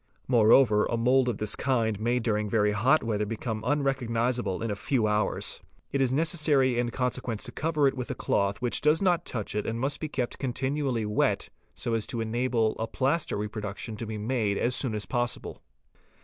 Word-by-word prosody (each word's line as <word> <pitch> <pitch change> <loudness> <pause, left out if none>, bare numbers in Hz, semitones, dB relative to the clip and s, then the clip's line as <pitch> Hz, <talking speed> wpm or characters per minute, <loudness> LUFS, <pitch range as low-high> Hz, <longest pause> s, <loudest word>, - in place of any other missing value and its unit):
Moreover 115 -2 +5
a 115 - -1
mould 125 +2 +3
of 115 - -2
this 105 -1 +1
kind 115 -5 0
may 120 +3 +1
during 105 -3 -1
very 105 -1 +2
hot 125 +9 +3
weather 105 -2 -1
become 110 0 -4
unrecognisable 125 -6 0
in 115 - -2
a - - -2
few 115 +2 0
hours. 105 0 -1 0.3
It 140 - 0
is 130 -2 +2
necessary 145 -4 +2
in 120 -1 0
consequence 125 -3 -2
to - - -4
cover 155 -3 +1
it 135 - +1
with 125 -2 -5
a 130 - -3
cloth 100 +1 0
which 120 - 0
does 150 +2 +4
not 175 -3 +2
touch 110 -5 -4
it 105 0 -2
and 115 +1 -2
must 135 +3 -1
be 155 - -4
kept 125 -4 -3
continually 130 -2 -1
wet, 105 0 0 0.3
so 115 - -3
as 115 -2 0
to 125 -3 -3
enable 115 0 0
a 115 - -1
plaster 140 +5 0
reproduction 105 +1 -5
to 115 - -5
be 110 0 -4
made 105 -2 0
as 125 +1 +1
soon 125 -4 +2
as 105 - -3
possible. 120 -1 -2
120 Hz, 195 wpm, -27 LUFS, 110-130 Hz, 0.3 s, Moreover